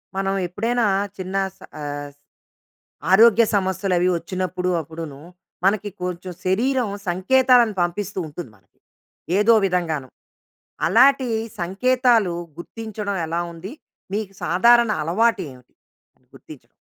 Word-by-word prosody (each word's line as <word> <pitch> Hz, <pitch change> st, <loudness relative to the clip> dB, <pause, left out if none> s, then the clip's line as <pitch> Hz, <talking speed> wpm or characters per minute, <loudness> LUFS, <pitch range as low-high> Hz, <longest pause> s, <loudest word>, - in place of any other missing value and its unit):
మనం 195 Hz, 0 st, -1 dB
ఎప్పుడైనా 230 Hz, +6 st, -1 dB, 0.3 s
చిన్న 185 Hz, 0 st, -6 dB, 0.2 s
స -, -, -33 dB, 0.2 s
ఆహ్, 145 Hz, 0 st, -5 dB, 1.0 s
ఆరోగ్య 230 Hz, +3 st, +7 dB
సమస్యలు 190 Hz, -1 st, 0 dB
అవి 180 Hz, +1 st, +2 dB
వచ్చినప్పుడు 180 Hz, +1 st, -3 dB
అప్పుడునూ, 160 Hz, -2 st, -9 dB, 0.4 s
మనకి 205 Hz, +1 st, +1 dB
కొంచెం 180 Hz, 0 st, -4 dB
శరీరం 240 Hz, +5 st, +1 dB, 0.2 s
సంకేతాలను 240 Hz, +4 st, +3 dB
పంపిస్తూ 190 Hz, +3 st, -2 dB
ఉంటుంది 155 Hz, -1 st, -8 dB
మనకి 95 Hz, -1 st, -36 dB, 0.6 s
ఏదో 220 Hz, +3 st, +5 dB
విధంగాను. 165 Hz, -7 st, -1 dB, 0.8 s
అలాంటి 265 Hz, +2 st, +5 dB, 0.3 s
సంకేతాలు 230 Hz, +1 st, +2 dB, 0.3 s
గుర్తించడం 210 Hz, +1 st, -5 dB
ఎలా 170 Hz, +2 st, -1 dB
ఉంది? 175 Hz, +5 st, -9 dB, 0.4 s
మీకు 205 Hz, -1 st, -3 dB
సాధారణ 235 Hz, +8 st, +4 dB
అలవాటు 205 Hz, +7 st, +1 dB
ఏమిటి 125 Hz, -1 st, -18 dB, 0.6 s
గుర్తించడం? -, -, -14 dB
190 Hz, 105 wpm, -22 LUFS, 175-225 Hz, 1.0 s, ఆరోగ్య